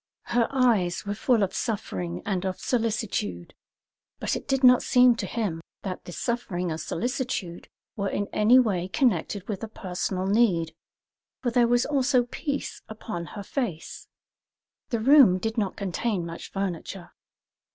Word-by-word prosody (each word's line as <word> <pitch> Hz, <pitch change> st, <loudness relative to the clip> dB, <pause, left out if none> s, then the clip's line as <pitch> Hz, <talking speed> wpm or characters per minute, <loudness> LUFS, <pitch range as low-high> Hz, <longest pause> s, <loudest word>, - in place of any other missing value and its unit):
Her 235 Hz, -1 st, +3 dB
eyes 220 Hz, -10 st, +2 dB
were 205 Hz, -, -2 dB
full 225 Hz, +1 st, +2 dB
of 195 Hz, 0 st, -1 dB
suffering 90 Hz, -, -3 dB
and 190 Hz, -2 st, -1 dB
of 190 Hz, -1 st, -3 dB
solicitude; 215 Hz, -, -2 dB, 0.7 s
but -, -, -1 dB
it -, -, -6 dB
did 270 Hz, -1 st, 0 dB
not 250 Hz, -1 st, +7 dB
seem 250 Hz, -1 st, +5 dB
to -, -, -3 dB
him 200 Hz, -8 st, -2 dB, 0.2 s
that 185 Hz, -2 st, -5 dB
the -, -, -8 dB
suffering 180 Hz, -6 st, -2 dB
and 160 Hz, -, -4 dB
solicitude 240 Hz, -6 st, -3 dB, 0.3 s
were 200 Hz, -1 st, -1 dB
in 205 Hz, -, -1 dB
any 220 Hz, +4 st, +5 dB
way 195 Hz, -8 st, +2 dB
connected 195 Hz, -, 0 dB
with 205 Hz, -4 st, -4 dB
a -, -, -3 dB
personal 185 Hz, -2 st, -3 dB
need, 190 Hz, -6 st, +2 dB, 0.7 s
for 240 Hz, -, +1 dB
there 240 Hz, 0 st, +4 dB
was 240 Hz, +1 st, +3 dB
also 270 Hz, -3 st, +2 dB
peace 280 Hz, +4 st, -4 dB
upon 210 Hz, -6 st, -6 dB
her 200 Hz, -, -5 dB
face. 195 Hz, -, -4 dB, 0.8 s
The 230 Hz, -, 0 dB
room 255 Hz, -6 st, +7 dB
did 225 Hz, +4 st, -3 dB
not 205 Hz, -5 st, -1 dB
contain 195 Hz, -1 st, -2 dB
much 165 Hz, 0 st, -7 dB
furniture. 190 Hz, -1 st, -4 dB
210 Hz, 150 wpm, -26 LUFS, 180-240 Hz, 0.8 s, not